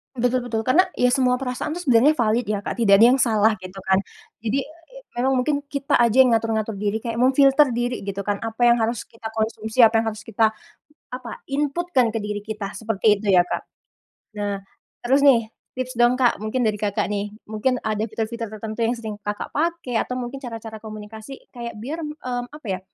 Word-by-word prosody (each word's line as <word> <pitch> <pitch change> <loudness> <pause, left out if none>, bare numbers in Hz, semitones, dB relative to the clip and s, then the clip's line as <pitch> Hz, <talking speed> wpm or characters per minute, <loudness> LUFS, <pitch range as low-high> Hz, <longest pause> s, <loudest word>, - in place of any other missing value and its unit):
Betul 245 +1 0
betul. 225 -2 -2
Karena 325 +11 +4
ya 250 0 +3
semua 255 -1 +3
perasaan 260 +4 -3
tuh 355 - -5
sebenarnya 270 +2 +5
valid 230 -1 +1
ya 205 -1 -2
Kak, 240 - -4
tidak 200 -4 +6
ada - - +10
yang 265 - +2
salah 220 -3 +4
gitu 185 0 -10
kan. 190 0 +3 0.4
Jadi, 230 +5 -1
e 335 - -16
memang 265 +2 +1
mungkin 290 0 0
kita 280 0 -5
aja 235 +1 +3
yang 250 - +2
ngatur-ngatur 225 -1 -1
diri 205 +1 0
kayak 230 -1 -3
memfilter 270 +3 +5
diri 245 +1 -1
gitu 200 0 -5
kan, 205 0 -1
apa 225 +1 -3
yang 240 0 +5
harus 225 +1 -1
kita 225 -1 -9
konsumsi, 220 +2 +1
apa 225 0 +6
yang 225 - -1
harus 215 0 -10
kita 220 0 +1 0.6
apa, 250 -2 -7
input 295 +5 -1
kan 245 -3 +4
ke 225 - -2
diri 210 -1 -4
kita 210 -2 -5
seperti 220 -1 +2
itu 200 -1 0
ya 180 -1 +6
Kak. - - -2 0.7
Nah 205 -1 -2 0.4
terus 270 +4 +3
nih 235 -6 +5 0.2
tips 255 0 -4
dong 240 +2 +3
Kak, 245 -2 +4
mungkin 235 +2 0
dari 215 - 0
Kakak 205 -1 -1
nih, 205 0 -3 0.2
mungkin 220 +4 0
ada 215 -1 -2
fitur-fitur 225 +1 -4
tertentu 215 +1 -7
yang 235 +2 +1
sering 220 -2 -6
Kakak 205 0 -5
pakai 330 -5 -1
atau 250 0 -4
mungkin 250 +2 -5
cara-cara 225 -2 -7
komunikasi 215 +4 -9
kayak 235 -3 -6
biar, 300 +9 -5
eee, 255 -5 -4
apa 300 -5 -12
ya, 185 -2 -2
230 Hz, 200 wpm, -23 LUFS, 215-255 Hz, 0.7 s, ada